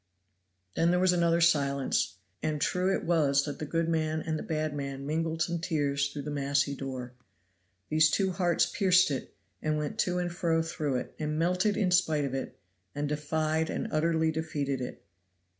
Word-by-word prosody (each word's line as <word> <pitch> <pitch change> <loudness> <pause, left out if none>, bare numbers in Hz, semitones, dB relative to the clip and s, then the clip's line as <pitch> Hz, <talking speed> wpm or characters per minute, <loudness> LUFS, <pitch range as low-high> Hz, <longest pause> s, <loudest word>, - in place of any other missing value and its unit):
Then 165 - +2
there 180 +1 +3
was 185 0 +4
another 170 -1 +2
silence, 140 - +2 0.3
and 155 -1 -1
true 185 +5 +1
it - - 0
was 150 -5 +3
that 145 -2 -5
the 155 - -4
good 165 +2 0
man 160 -1 0
and 160 -1 -2
the - - -5
bad 155 -1 -2
man 140 -1 -5
mingled 160 +2 0
some 170 0 -2
tears 145 -4 0
through 145 -1 -6
the 150 - -4
massy 140 0 +1
door. 130 -2 -6 0.8
These 155 +1 +5
two 190 +2 +1
hearts 175 -2 +2
pierced 185 -5 +3
it, 135 - -5 0.3
and 155 0 0
went 150 -1 -4
to 180 -1 +1
and 175 -1 -1
fro 165 -2 +1
through 155 -4 -2
it, 125 - -4
and 150 0 -2
melted 180 +5 +1
in 185 -4 +1
spite 160 -5 +3
of 135 - -4
it, 135 - -4 0.4
and 145 0 -1
defied 155 +2 -1
and - - -3
utterly 160 +1 +2
defeated 145 -4 -2
it. 125 - -7
155 Hz, 185 wpm, -29 LUFS, 145-170 Hz, 0.8 s, These